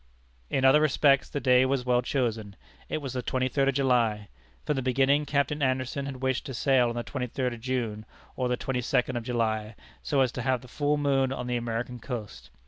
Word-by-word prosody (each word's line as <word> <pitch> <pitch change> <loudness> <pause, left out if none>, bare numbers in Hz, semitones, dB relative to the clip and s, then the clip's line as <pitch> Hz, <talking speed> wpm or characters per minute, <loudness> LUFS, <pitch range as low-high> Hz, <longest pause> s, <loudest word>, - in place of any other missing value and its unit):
In 135 - +1
other 135 +3 +6
respects 140 -2 +3
the 145 - -3
day 125 -1 +4
was 130 -1 0
well 125 -1 +3
chosen. 115 -6 -2 0.3
It 155 - -3
was 135 -2 -4
the 125 - -2
twenty 130 +1 -1
third 135 +1 +1
of 135 - -1
July. 115 -6 +1 0.4
From 150 - 0
the 135 - -1
beginning, 135 +3 +2
Captain 145 +1 0
Anderson 130 +1 -1
had 135 -1 -7
wished 130 +2 0
to 135 - -5
sail 130 -2 +3
on 120 - -4
the 120 - -2
twenty 125 -1 -4
third 125 +1 -2
of 115 - -10
June, 115 -4 -3 0.3
or 125 - -1
the 125 - 0
twenty 125 -1 -2
second 125 0 0
of 120 - -2
July, 110 -2 -1 0.3
so 140 -3 +1
as 130 -3 +2
to 125 - -5
have 130 -1 0
the 125 - -13
full 145 +4 0
moon 135 -2 +1
on 125 -2 -4
the 125 0 -1
American 120 +1 -3
coast. 115 -4 -7
130 Hz, 220 wpm, -27 LUFS, 120-135 Hz, 0.4 s, other